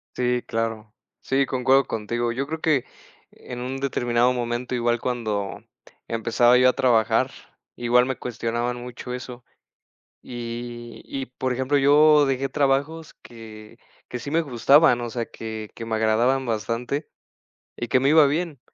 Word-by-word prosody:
Sí, 125 Hz, 0 st, 0 dB
claro. 115 Hz, -1 st, -3 dB, 0.3 s
Sí, 135 Hz, +1 st, +1 dB
concuerdo 130 Hz, +1 st, +2 dB
contigo, 115 Hz, +2 st, -2 dB
yo 135 Hz, +4 st, -3 dB
creo 160 Hz, +1 st, -4 dB
que 145 Hz, -6 st, +1 dB, 0.5 s
en 125 Hz, -, -9 dB
un 130 Hz, +2 st, -4 dB
determinado 120 Hz, -2 st, +1 dB
momento, 120 Hz, 0 st, -3 dB
igual 120 Hz, -1 st, +1 dB
cuando 110 Hz, -6 st, -3 dB, 0.5 s
empezaba 115 Hz, +2 st, +3 dB
yo 130 Hz, 0 st, +5 dB
a -, -, +1 dB
trabajar 115 Hz, -4 st, +2 dB, 0.4 s
igual 120 Hz, +1 st, +3 dB
me 130 Hz, -2 st, -3 dB
cuestionaban 120 Hz, 0 st, -3 dB
mucho 125 Hz, 0 st, -7 dB
eso 125 Hz, -1 st, -8 dB, 0.8 s
y 120 Hz, -1 st, -7 dB
y 135 Hz, -1 st, -5 dB
por 130 Hz, +1 st, -3 dB
ejemplo, 130 Hz, +3 st, 0 dB
yo 150 Hz, +2 st, +6 dB
dejé 135 Hz, 0 st, -1 dB
trabajos 145 Hz, +3 st, 0 dB
que 110 Hz, -2 st, -12 dB, 0.3 s
que 125 Hz, -, -5 dB
sí 140 Hz, +4 st, -7 dB
me 165 Hz, -, +2 dB
gustaban, 135 Hz, -1 st, +4 dB
o 120 Hz, -, -4 dB
sea 115 Hz, -1 st, -3 dB
que 110 Hz, -1 st, -7 dB
que 115 Hz, -, -7 dB
me 115 Hz, -1 st, -2 dB
agradaban 120 Hz, +5 st, +2 dB
bastante 115 Hz, -, -3 dB, 0.7 s
y 120 Hz, -, -5 dB
que 130 Hz, -, +3 dB
me 135 Hz, -, +2 dB
iba 155 Hz, -1 st, +7 dB
bien, 150 Hz, -1 st, -2 dB
125 Hz, 150 wpm, -24 LUFS, 115-135 Hz, 0.8 s, iba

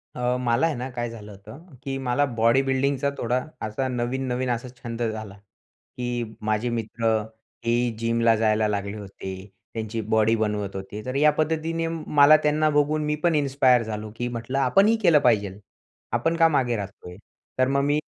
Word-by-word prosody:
अ, 125 Hz, 0 st, 0 dB
मला 120 Hz, +4 st, +2 dB
आहे 165 Hz, -, 0 dB
ना 125 Hz, +2 st, -5 dB
काय 120 Hz, -1 st, -3 dB
झालं 105 Hz, -2 st, -10 dB
होतं 110 Hz, -, -13 dB, 0.2 s
की 135 Hz, 0 st, -3 dB
मला 130 Hz, +1 st, +1 dB
बॉडी 115 Hz, +4 st, +4 dB
बिल्डिंगचा 135 Hz, +1 st, 0 dB
थोडा 125 Hz, +2 st, 0 dB, 0.2 s
असा 110 Hz, +5 st, -2 dB
नवीन, 125 Hz, +2 st, -2 dB
नवीन 125 Hz, +1 st, -1 dB
असा 120 Hz, +1 st, -2 dB, 0.2 s
छंद 120 Hz, 0 st, -5 dB
झाला. 110 Hz, -3 st, -3 dB, 0.6 s
की 120 Hz, -1 st, -2 dB, 0.2 s
माझे 110 Hz, +2 st, 0 dB
मित्र 115 Hz, 0 st, -4 dB, 0.6 s
हेही 120 Hz, +1 st, +1 dB
जिमला 115 Hz, 0 st, +2 dB
जायला 110 Hz, -1 st, +2 dB
लागले 100 Hz, 0 st, -3 dB
होते. 95 Hz, -2 st, -7 dB, 0.4 s
त्यांची 110 Hz, 0 st, -3 dB
बॉडी 110 Hz, +1 st, +2 dB
बनवत 105 Hz, -3 st, -2 dB
होते. 95 Hz, +2 st, -6 dB
तर 130 Hz, +1 st, -4 dB
या 150 Hz, +2 st, +5 dB
पद्धतीने 160 Hz, +2 st, -1 dB
मला 155 Hz, -2 st, +5 dB
त्यांना 155 Hz, +1 st, +2 dB
बघून 150 Hz, +1 st, +1 dB
मी 150 Hz, 0 st, 0 dB
पण 170 Hz, -2 st, +3 dB
इन्स्पायर 135 Hz, -4 st, +3 dB
झालो, 110 Hz, -1 st, -5 dB
की 120 Hz, -, -3 dB
म्हटलं 120 Hz, +2 st, -4 dB
आपणही 200 Hz, +10 st, +4 dB
केलं 170 Hz, -6 st, +5 dB
पाहिजे. 110 Hz, -8 st, +2 dB, 0.6 s
आपण 165 Hz, +1 st, +1 dB
का 165 Hz, -, +6 dB
मागे 130 Hz, -6 st, +1 dB
राहतोय? 100 Hz, -3 st, -7 dB, 0.4 s
तर 130 Hz, -, +4 dB
मग 140 Hz, +1 st, +1 dB
मी 145 Hz, +1 st, +2 dB
120 Hz, 170 wpm, -24 LUFS, 110-140 Hz, 0.6 s, का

